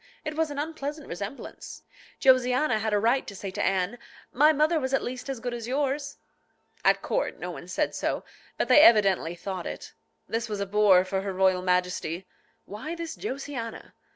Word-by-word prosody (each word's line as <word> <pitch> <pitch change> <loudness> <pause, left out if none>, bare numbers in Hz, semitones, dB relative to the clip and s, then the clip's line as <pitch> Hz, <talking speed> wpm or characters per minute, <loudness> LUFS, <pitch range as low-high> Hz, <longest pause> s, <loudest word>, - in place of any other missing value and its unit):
It 305 0 -3
was 320 0 +1
an 290 - -6
unpleasant 300 -1 -4
resemblance. 200 +9 -7 0.4
Josiana 255 -1 +4
had 220 +1 -1
a 210 - +3
right 235 +6 +2
to 200 - -7
say 195 0 -6
to - - -4
Anne, 195 +5 0 0.3
"My 300 +5 +6
mother 310 +2 +2
was 260 -1 0
at - - -1
least 255 +2 -5
as 265 -3 -3
good 245 0 -4
as 235 -1 -5
yours." 280 +2 -1 0.7
At - - +3
court - - -1
no - - -5
one - - -9
said - - -1
so, - - -2 0.3
but - - 0
they 295 - +8
evidently 195 - +5
thought 185 0 -5
it. - - -7 0.3
This 225 0 -2
was 210 -1 -3
a 200 - -1
bore 195 -2 +5
for 190 0 -1
her 195 0 -3
royal 185 -1 +3
Majesty. 180 -1 -1 0.4
Why 275 +12 -6
this 335 -1 -5
Josiana? 270 - -6
235 Hz, 185 wpm, -27 LUFS, 195-285 Hz, 0.7 s, they